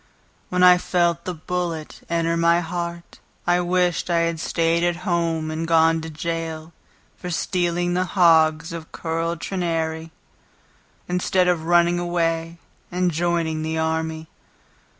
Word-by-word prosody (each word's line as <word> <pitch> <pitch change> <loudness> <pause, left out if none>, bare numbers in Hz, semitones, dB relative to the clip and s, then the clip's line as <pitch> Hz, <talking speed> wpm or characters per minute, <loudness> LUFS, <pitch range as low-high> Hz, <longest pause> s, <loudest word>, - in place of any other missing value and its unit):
When 180 0 +1
I 180 0 +8
felt 170 -2 0
the 180 - -3
bullet 165 -1 -4
enter 165 0 0
my 170 +1 +3
heart 170 0 -5 0.3
I 175 0 +3
wished 180 0 0
I 170 -1 +2
had 165 -1 -1
staid 165 +1 +1
at 175 0 +1
home 165 -3 0
and 160 +1 -3
gone 165 0 +4
to 160 - -6
jail 160 0 -4 0.4
For 180 - -7
stealing 175 0 0
the 180 +1 +1
hogs 160 -1 +4
of 165 -1 -8
Curl 165 +1 -2
Trenary, 165 -3 -3 1.0
Instead 180 +1 +1
of 170 -3 +1
running 175 +1 +3
away 165 -1 -1 0.3
and 180 0 +1
joining 165 -1 -1
the 160 +1 -2
army. 160 0 -2
170 Hz, 135 wpm, -22 LUFS, 160-175 Hz, 1.0 s, I